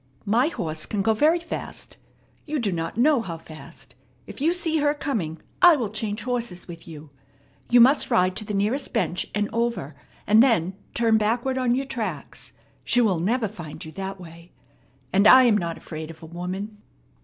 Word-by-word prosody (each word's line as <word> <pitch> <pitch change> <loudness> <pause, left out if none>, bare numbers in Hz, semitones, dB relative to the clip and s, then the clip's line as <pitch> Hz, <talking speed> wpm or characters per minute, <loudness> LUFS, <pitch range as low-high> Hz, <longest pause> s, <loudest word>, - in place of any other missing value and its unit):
"My 235 +7 +3
horse 160 - -3
can 205 -2 -2
go 220 - +3
very 305 +10 +3
fast. 335 - -7 0.5
You 305 0 -2
do 225 -7 -1
not 165 +3 -4
know 275 +1 +4
how 170 -7 -6
fast. 160 -1 -12 0.3
If - - -10
you 320 +4 +3
see 335 -2 0
her 295 0 +1
coming, 205 - -3 0.2
I 350 -2 +8
will 235 -8 -3
change 215 0 -3
horses 240 -7 -3
with 170 -1 -11
you. 155 -2 -11 0.6
You 245 0 +6
must 265 +5 +5
ride 185 0 +2
to 215 - 0
the 205 - -4
nearest 220 +8 -1
bench 200 -6 -1
and 205 0 0
over, 230 - -2 0.3
and 215 +1 +6
then 205 -8 +2 0.2
turn 225 -2 +3
backward 240 +5 0
on 245 -1 +2
your 270 +2 -2
tracks. 235 -5 -6 0.3
She 245 - +2
will 205 -8 +2
never 220 +6 0
find 170 -4 -9
you 160 - -9
that 195 +1 -6
way. 170 0 -13 0.6
And 200 +2 +5
I 260 +4 +9
am 235 -4 +4
not 170 -4 -2
afraid 155 0 -8
of 165 0 -12
a - - -7
woman." 185 +5 -6
215 Hz, 190 wpm, -24 LUFS, 175-245 Hz, 0.6 s, I